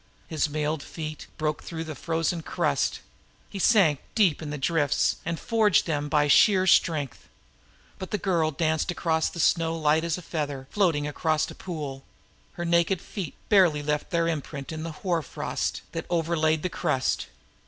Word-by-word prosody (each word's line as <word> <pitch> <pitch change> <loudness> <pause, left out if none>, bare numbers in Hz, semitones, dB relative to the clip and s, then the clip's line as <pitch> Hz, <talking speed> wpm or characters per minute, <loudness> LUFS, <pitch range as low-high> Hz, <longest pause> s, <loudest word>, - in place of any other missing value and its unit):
His 155 -1 0
mailed 150 0 -1
feet 155 0 -7
broke 155 -1 -1
through 165 -1 -5
the 160 -1 -6
frozen 165 +3 -1
crust; - - -1 0.5
he 200 - -5
sank 185 - +4 0.2
deep 185 -10 +3
in 155 - -5
the 150 - -4
drifts 145 0 +1
and 170 -1 -2
forged 220 -4 +3
through 165 - -1
them 145 0 -2
by 150 -1 +3
sheer 190 +5 +5
strength. 155 -7 +2 0.7
But 190 - -6
the 210 - -1
girl 170 -5 +1
danced 160 +2 0
across 160 -2 0
the 170 - -9
snow 165 0 +2
as 160 - -8
light 155 +2 +3
as 170 0 -1
a 180 - -9
feather 145 -5 -4
floating 165 -8 +1
across 155 +1 0
a - - -8
pool; 145 -7 -6 0.5
her 175 - -4
naked 170 +2 +2
feet 180 -2 -6
scarcely 175 -8 +4
left 150 0 -1
their 170 -1 +1
imprint 150 -2 -4
on 155 - -5
the 165 +1 -4
hoar 175 -4 +1
frost. 140 - -3
160 Hz, 165 wpm, -26 LUFS, 150-170 Hz, 0.7 s, sheer